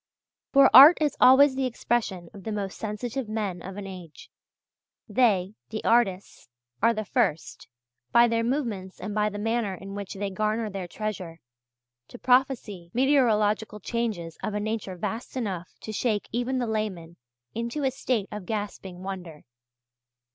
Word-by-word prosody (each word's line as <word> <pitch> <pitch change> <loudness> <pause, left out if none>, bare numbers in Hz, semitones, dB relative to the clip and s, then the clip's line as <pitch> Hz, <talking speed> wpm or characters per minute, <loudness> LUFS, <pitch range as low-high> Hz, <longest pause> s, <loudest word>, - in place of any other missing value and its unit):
For 275 -1 +6
art 290 +6 +11
is 300 -3 +1
always 265 +2 +7
the 265 -1 0
expression 220 -7 -2
of 200 -3 -11
the 220 - -4
most 200 -2 -3
sensitive 225 +3 -4
men 205 -5 -3
of 195 +2 -8
an 205 - -6
age. 180 -5 -11 0.8
They, 205 -6 +2 0.2
the 215 0 -5
artists, 200 - +1 0.3
are 230 +2 +5
the 215 -2 -3
first, 195 - -1 0.4
by 235 0 +6
their 230 0 0
movements 230 -8 -3
and 205 +2 -5
by 210 0 +1
the 205 - -7
manner 225 -2 -1
in 195 +2 -9
which 200 -1 -6
they 200 0 -3
garner 215 +2 -1
their 190 -2 -5
treasure, 185 -5 -5 0.7
to - - -11
prophesy 245 -9 +1
meteorological 220 -6 +2
changes 205 -7 -3
of 210 - -3
a - - 0
nature 210 -3 -3
vast 225 +8 -5
enough 190 -8 -3
to 220 - -6
shake 215 -2 -1
even 245 +3 -1
the 250 - 0
layman 200 -7 -4 0.4
into 235 +6 -3
a 265 - +2
state 240 -5 -1
of 210 -4 -7
gasping 200 -4 -5
wonder. 180 -5 -7
215 Hz, 155 wpm, -26 LUFS, 190-240 Hz, 0.8 s, art